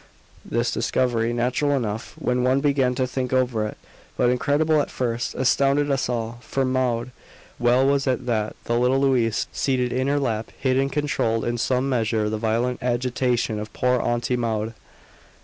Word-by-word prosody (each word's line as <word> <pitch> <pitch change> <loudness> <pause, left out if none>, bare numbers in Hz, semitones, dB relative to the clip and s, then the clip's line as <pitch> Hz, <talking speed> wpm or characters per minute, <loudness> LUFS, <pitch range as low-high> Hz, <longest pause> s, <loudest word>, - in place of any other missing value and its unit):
This - - -1
discovery 120 -2 0
natural 125 +5 +1
enough 110 -2 -4
when 125 0 0
one 130 +2 +3
began 135 -3 +2
to 130 - +1
think 125 0 -3
over 125 -4 +1
it, - - -8 0.4
but 120 - +3
incredible 150 +4 +2
at - - -4
first, 120 0 -2
astounded 140 +2 +2
us 135 -2 0
all. 120 -1 -3
For 135 +1 -1
Maud 125 -2 0 0.5
well 120 +2 +3
was 140 0 +2
it 130 -2 0
that 110 -3 -1
the 120 0 0
little 125 +2 +3
Louise 125 -5 +2
seated 125 -2 0
in 130 +1 0
her 145 +1 +2
lap 115 -5 -2
hid 130 -1 +1
and 135 0 0
controlled 125 -6 0
in 120 0 -1
some 130 +3 +1
measure 110 -4 0
the 110 - -2
violent 115 +3 0
agitation 125 -2 0
of 105 0 -6
poor 125 -1 +1
Auntie 120 +1 0
Maud. 110 -1 -2
125 Hz, 170 wpm, -23 LUFS, 115-130 Hz, 0.5 s, one